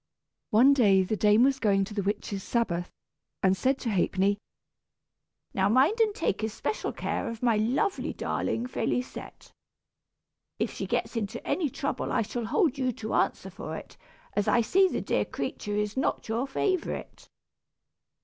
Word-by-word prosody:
One 245 Hz, +5 st, +6 dB
day 200 Hz, -8 st, +5 dB
the 200 Hz, +4 st, -1 dB
dame 210 Hz, +2 st, +5 dB
was 270 Hz, 0 st, +3 dB
going 195 Hz, -4 st, +2 dB
to 210 Hz, -, -9 dB
the 205 Hz, -, -1 dB
Witches' 200 Hz, 0 st, -2 dB
Sabbath, 180 Hz, -6 st, -1 dB, 0.5 s
and 190 Hz, 0 st, +4 dB
said 265 Hz, +7 st, +1 dB
to 230 Hz, -, -1 dB
Ha'penny, 195 Hz, +1 st, +1 dB, 1.1 s
"Now 195 Hz, +1 st, +2 dB
mind 275 Hz, -, +4 dB
and 430 Hz, -2 st, +3 dB
take 455 Hz, -, -1 dB
especial 220 Hz, -, -2 dB
care 255 Hz, -, -3 dB
of 230 Hz, +1 st, -7 dB
my 235 Hz, -2 st, +4 dB
lovely 250 Hz, -, 0 dB
darling, 235 Hz, -, -2 dB
Félisette. 250 Hz, 0 st, -4 dB, 1.1 s
If -, -, -1 dB
she -, -, -4 dB
gets -, -, -1 dB
into 225 Hz, +1 st, -3 dB
any 325 Hz, -6 st, +1 dB
trouble 275 Hz, +2 st, -3 dB
I -, -, +2 dB
shall 235 Hz, +2 st, -4 dB
hold 285 Hz, -, +1 dB
you 255 Hz, -1 st, +1 dB
to 220 Hz, 0 st, -5 dB
answer -, -, 0 dB
for -, -, -6 dB
it, -, -, -11 dB, 0.4 s
as 205 Hz, -, 0 dB
I 240 Hz, -, +4 dB
see 380 Hz, -, +4 dB
the -, -, -2 dB
dear -, -, +1 dB
creature 205 Hz, 0 st, -4 dB
is 210 Hz, 0 st, -1 dB
not 265 Hz, -, -1 dB
your 230 Hz, +4 st, -1 dB
favorite." 370 Hz, +6 st, -2 dB
230 Hz, 160 wpm, -28 LUFS, 205-265 Hz, 1.1 s, One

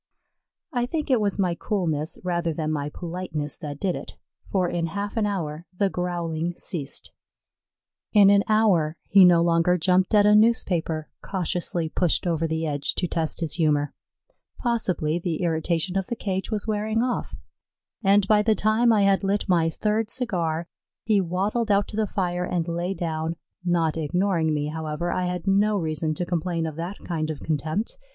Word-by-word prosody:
I 245 Hz, -1 st, 0 dB
think 300 Hz, 0 st, -2 dB
it 245 Hz, -4 st, +4 dB
was 200 Hz, -2 st, +1 dB
my 185 Hz, -3 st, +1 dB
coolness 165 Hz, -5 st, -1 dB
rather 170 Hz, -2 st, -1 dB
than 155 Hz, 0 st, -2 dB
my 145 Hz, -1 st, -2 dB
politeness 165 Hz, -3 st, -5 dB
that 145 Hz, -2 st, -6 dB
did 185 Hz, -3 st, 0 dB
it, -, -, -8 dB, 0.3 s
for 185 Hz, -2 st, +2 dB
in 170 Hz, -1 st, -1 dB
half 200 Hz, +5 st, -4 dB
an 220 Hz, -2 st, +1 dB
hour 170 Hz, -5 st, -4 dB
the 200 Hz, -1 st, +2 dB
growling 175 Hz, -1 st, -2 dB
ceased. 150 Hz, -7 st, -4 dB, 1.0 s
In 200 Hz, -2 st, +7 dB
an 200 Hz, 0 st, +5 dB
hour 190 Hz, -8 st, +3 dB
he 195 Hz, -1 st, +6 dB
no 175 Hz, -2 st, +6 dB
longer 170 Hz, +1 st, +3 dB
jumped 185 Hz, +4 st, +2 dB
at 205 Hz, -1 st, +6 dB
a 210 Hz, -, +6 dB
newspaper 180 Hz, -8 st, +2 dB
cautiously 175 Hz, -2 st, -2 dB
pushed 175 Hz, +2 st, 0 dB
over 165 Hz, -2 st, 0 dB
the 160 Hz, 0 st, -2 dB
edge 145 Hz, -2 st, -2 dB
to 180 Hz, -, -1 dB
test 165 Hz, -1 st, -2 dB
his 165 Hz, -3 st, 0 dB
humor; 145 Hz, -2 st, +2 dB, 0.6 s
possibly 185 Hz, -, 0 dB
the 175 Hz, 0 st, -2 dB
irritation 170 Hz, +2 st, 0 dB
of 195 Hz, -1 st, 0 dB
the 235 Hz, -, -2 dB
cage 190 Hz, -3 st, -3 dB
was 215 Hz, -3 st, -2 dB
wearing 220 Hz, +1 st, 0 dB
off, 250 Hz, -1 st, -2 dB, 0.7 s
and 200 Hz, 0 st, +4 dB
by 210 Hz, 0 st, +5 dB
the 220 Hz, 0 st, +2 dB
time 220 Hz, +3 st, +3 dB
I 210 Hz, -2 st, +4 dB
had 195 Hz, 0 st, +3 dB
lit 200 Hz, +1 st, 0 dB
my 170 Hz, -3 st, +3 dB
third 215 Hz, +6 st, -1 dB
cigar, 170 Hz, -10 st, -1 dB, 0.4 s
he 210 Hz, -3 st, +3 dB
waddled 200 Hz, +6 st, -1 dB
out 200 Hz, 0 st, +3 dB
to -, -, -7 dB
the 215 Hz, -1 st, +1 dB
fire 180 Hz, -2 st, -1 dB
and 175 Hz, -2 st, -1 dB
lay 175 Hz, +3 st, -2 dB
down; 160 Hz, -2 st, -2 dB, 0.3 s
not 170 Hz, -3 st, +1 dB
ignoring 165 Hz, +1 st, +1 dB
me, 150 Hz, -1 st, -1 dB
however, 160 Hz, +2 st, -3 dB
I 180 Hz, -, -1 dB
had 180 Hz, 0 st, -3 dB
no 205 Hz, +2 st, +3 dB
reason 155 Hz, -2 st, -1 dB
to 175 Hz, -, -2 dB
complain 170 Hz, -1 st, -1 dB
of 160 Hz, -2 st, -4 dB
that 175 Hz, +4 st, -4 dB
kind 160 Hz, -3 st, -2 dB
of 155 Hz, -, -5 dB
contempt. 160 Hz, -, -2 dB
180 Hz, 175 wpm, -25 LUFS, 160-205 Hz, 1.0 s, In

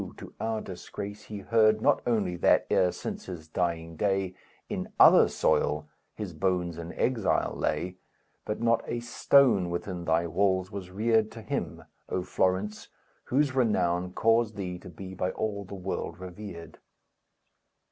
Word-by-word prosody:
to -, -, -10 dB
our 110 Hz, -1 st, -1 dB
disgrace 100 Hz, +3 st, -7 dB
he 105 Hz, -, -7 dB
heard 110 Hz, +1 st, +4 dB
Not -, -, +3 dB
only 105 Hz, -7 st, +1 dB
that, -, -, +4 dB
e'er 90 Hz, -1 st, +4 dB
since -, -, -6 dB
his 85 Hz, -4 st, -7 dB
dying 85 Hz, -1 st, -2 dB
day, 95 Hz, 0 st, 0 dB, 0.3 s
In -, -, -4 dB
other -, -, +8 dB
soil 75 Hz, 0 st, +1 dB, 0.3 s
his 105 Hz, -5 st, -5 dB
bones 90 Hz, -1 st, -1 dB
in 85 Hz, +1 st, -6 dB
exile 120 Hz, -5 st, +1 dB
lay, 90 Hz, +1 st, -2 dB, 0.5 s
But 105 Hz, +1 st, -4 dB
not 115 Hz, 0 st, +3 dB
a 120 Hz, -, -2 dB
stone 120 Hz, -5 st, +4 dB
within 85 Hz, 0 st, -4 dB
thy 80 Hz, +1 st, +2 dB
walls 95 Hz, +2 st, +1 dB
was 95 Hz, -3 st, -6 dB
reared 110 Hz, +3 st, +2 dB
To 115 Hz, -, -9 dB
him, 105 Hz, -, -3 dB, 0.3 s
O 90 Hz, -, -1 dB
Florence, 95 Hz, +3 st, 0 dB, 0.4 s
whose 140 Hz, +1 st, +2 dB
renown 90 Hz, -8 st, +1 dB
Caused 115 Hz, 0 st, +2 dB
thee 90 Hz, -3 st, -4 dB
to -, -, -11 dB
be 95 Hz, +2 st, -9 dB
by 90 Hz, 0 st, -1 dB
all 100 Hz, -2 st, -3 dB
the 100 Hz, -, -8 dB
world 95 Hz, -1 st, -4 dB
revered. 90 Hz, -2 st, -9 dB
95 Hz, 150 wpm, -28 LUFS, 90-110 Hz, 0.5 s, other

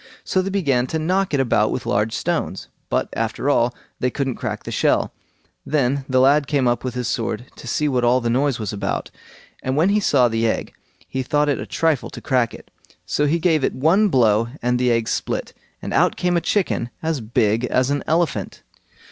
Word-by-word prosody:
So 185 Hz, -, +1 dB
they 190 Hz, -, -3 dB
began 140 Hz, -11 st, +1 dB
to 160 Hz, -, -2 dB
knock 185 Hz, +5 st, 0 dB
it 145 Hz, -, +1 dB
about 115 Hz, -4 st, +2 dB
with 125 Hz, -, -3 dB
large 105 Hz, +2 st, 0 dB
stones, -, -, -2 dB, 0.2 s
but, -, -, 0 dB
after 115 Hz, +5 st, -1 dB
all, 120 Hz, -3 st, +2 dB, 0.3 s
they 125 Hz, -, +1 dB
couldn't 135 Hz, 0 st, -2 dB
crack -, -, -4 dB
the -, -, -6 dB
shell. -, -, +1 dB, 0.5 s
Then 140 Hz, -2 st, 0 dB
the 130 Hz, 0 st, +3 dB
lad 140 Hz, +2 st, +4 dB
came 140 Hz, -4 st, +1 dB
up 120 Hz, 0 st, 0 dB
with 130 Hz, -1 st, -4 dB
his 125 Hz, -2 st, -2 dB
sword 115 Hz, 0 st, -2 dB
to -, -, -10 dB
see 150 Hz, +5 st, 0 dB
what 125 Hz, -3 st, +1 dB
all 120 Hz, +2 st, +4 dB
the 120 Hz, -, -3 dB
noise 130 Hz, +2 st, +1 dB
was 110 Hz, -2 st, -4 dB
about, 100 Hz, -, -3 dB, 0.5 s
and 130 Hz, +1 st, -2 dB
when 165 Hz, +6 st, +3 dB
he 210 Hz, +1 st, +3 dB
saw 135 Hz, -10 st, +3 dB
the 115 Hz, 0 st, 0 dB
egg, -, -, -2 dB, 0.3 s
he 130 Hz, -, -3 dB
thought 145 Hz, +2 st, +1 dB
it 140 Hz, -, 0 dB
a -, -, -6 dB
trifle 160 Hz, -5 st, 0 dB
to -, -, -9 dB
crack 125 Hz, -4 st, +1 dB
it; -, -, -13 dB, 0.3 s
so 150 Hz, -, +1 dB
he 160 Hz, +4 st, +2 dB
gave 160 Hz, -4 st, +2 dB
it -, -, 0 dB
one 170 Hz, +10 st, +3 dB
blow 115 Hz, -, +3 dB
and 125 Hz, 0 st, 0 dB
the 125 Hz, -1 st, +2 dB
egg 115 Hz, -1 st, +1 dB
split, -, -, -2 dB, 0.3 s
and -, -, -4 dB
out -, -, +3 dB
came 180 Hz, 0 st, 0 dB
a 170 Hz, -, +2 dB
chicken 175 Hz, -, 0 dB
as 160 Hz, -4 st, -1 dB
big 115 Hz, 0 st, +1 dB
as 130 Hz, +2 st, +1 dB
an 145 Hz, -, 0 dB
elephant. 155 Hz, -, -1 dB
130 Hz, 215 wpm, -21 LUFS, 120-150 Hz, 0.5 s, lad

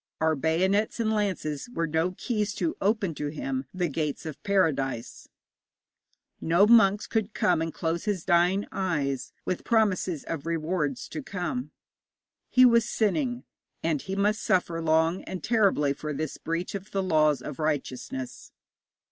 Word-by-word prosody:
Our 160 Hz, 0 st, +3 dB
bayonets 190 Hz, -, +1 dB
and 220 Hz, -1 st, +1 dB
lances 190 Hz, -, -2 dB
were 170 Hz, -9 st, -1 dB
no 165 Hz, +3 st, 0 dB
keys 210 Hz, 0 st, -2 dB
to 320 Hz, -, -1 dB
open 200 Hz, -3 st, +1 dB
to 150 Hz, 0 st, -4 dB
him 135 Hz, -3 st, -3 dB
the 180 Hz, -1 st, -1 dB
gates 150 Hz, -1 st, -3 dB
of 155 Hz, -3 st, -7 dB
paradise; 150 Hz, -, 0 dB, 1.1 s
no 170 Hz, +5 st, +4 dB
monks 210 Hz, -2 st, +5 dB
could 220 Hz, -1 st, -2 dB
come 175 Hz, -3 st, +2 dB
and 165 Hz, 0 st, -2 dB
close 165 Hz, +2 st, -2 dB
his 200 Hz, -5 st, -1 dB
dying 180 Hz, +3 st, +3 dB
eyes 145 Hz, -9 st, -1 dB
with 185 Hz, -, -2 dB
promises 195 Hz, -, +1 dB
of 160 Hz, -1 st, -5 dB
rewards 160 Hz, -4 st, -1 dB
to 155 Hz, -, -5 dB
come. 200 Hz, -, -4 dB, 0.8 s
He 255 Hz, 0 st, +6 dB
was 235 Hz, -2 st, +4 dB
sinning, 245 Hz, +3 st, 0 dB, 0.4 s
and 160 Hz, -4 st, 0 dB
he 195 Hz, -, -4 dB
must 210 Hz, +2 st, +1 dB
suffer 175 Hz, -2 st, +1 dB
long 160 Hz, +2 st, +2 dB
and 185 Hz, -4 st, -6 dB
terribly 195 Hz, -11 st, +3 dB
for 150 Hz, +1 st, -5 dB
this 155 Hz, +1 st, -4 dB
breach 165 Hz, +2 st, -3 dB
of 200 Hz, +1 st, -6 dB
the 195 Hz, -1 st, -1 dB
laws 155 Hz, -5 st, +3 dB
of -, -, -7 dB
righteousness. 135 Hz, -4 st, -3 dB
175 Hz, 150 wpm, -27 LUFS, 155-205 Hz, 1.1 s, He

